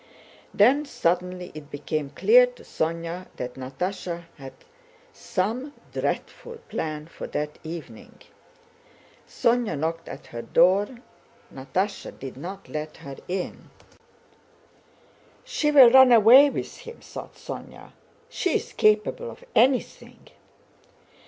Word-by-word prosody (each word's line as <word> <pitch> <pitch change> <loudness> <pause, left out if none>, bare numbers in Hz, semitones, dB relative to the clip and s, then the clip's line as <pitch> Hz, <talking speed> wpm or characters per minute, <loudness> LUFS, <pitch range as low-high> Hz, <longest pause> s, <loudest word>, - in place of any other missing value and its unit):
Then 260 +8 +4
suddenly 180 -6 -2
it 150 -1 -10
became 145 0 -3
clear - - +5
to - - -14
Sónya 165 +2 -3
that 125 0 -5
Natásha 170 +6 -5 0.2
had 135 -1 -9 0.6
some 235 +8 -3 0.2
dreadful 475 -1 -4
plan 155 -1 -4
for 165 - -9
that 150 0 -4
evening. 160 -9 -9 1.1
Sónya 235 -8 +1
knocked 165 +3 -3
at - - -9
her 115 - -4
door. 185 - +4 0.7
Natásha 140 +10 -3
did 135 -1 -8
not 190 +8 -8
let 155 0 -6
her 140 -1 -9
in. 185 0 -5 1.7
"She 300 - -1
will 270 -5 +8
run 260 0 +8
away 240 +5 +8
with - - -5
him!" 470 0 -10
thought - - -10
Sónya. - - -9 0.4
"She 360 - -1
is - - -2
capable 215 - +2
of - - -12
anything. 255 +1 +1
180 Hz, 115 wpm, -25 LUFS, 155-245 Hz, 1.7 s, will